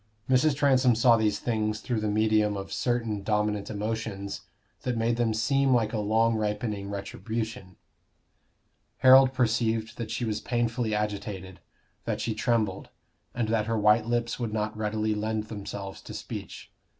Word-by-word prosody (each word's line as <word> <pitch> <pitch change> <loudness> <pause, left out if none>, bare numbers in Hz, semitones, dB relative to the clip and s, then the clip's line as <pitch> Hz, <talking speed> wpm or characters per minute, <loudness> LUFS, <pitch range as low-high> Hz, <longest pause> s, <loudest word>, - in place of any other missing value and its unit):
Mrs. 130 +3 +3
Transome 130 -4 +4
saw 115 +1 +5
these 110 -2 +1
things 110 -2 -1
through 115 +1 -2
the 105 - -1
medium 105 -1 +2
of 95 0 -6
certain 115 -1 -1
dominant 105 0 0
emotions 105 -2 -4 0.4
that 125 -3 -2
made 115 +1 +1
them 120 -2 +1
seem 130 +4 +2
like 115 -2 +1
a 110 - 0
long 110 +2 +2
ripening 105 -2 -2
retribution. 110 0 -5 1.3
Harold 130 0 +8
perceived 115 -2 0
that 115 - -4
she 120 - -2
was 110 -2 -2
painfully 120 -2 -1
agitated, 100 -3 -4 0.5
that - - -2
she 115 - -1
trembled, 110 -3 0 0.5
and 120 -3 -1
that 110 -1 +1
her 115 0 0
white 105 +1 +4
lips 120 0 -1
would 115 -3 -2
not 105 0 -2
readily 110 0 -1
lend 110 +1 -2
themselves 100 -2 -6
to - - -9
speech. - - -7
110 Hz, 150 wpm, -27 LUFS, 105-120 Hz, 1.3 s, Harold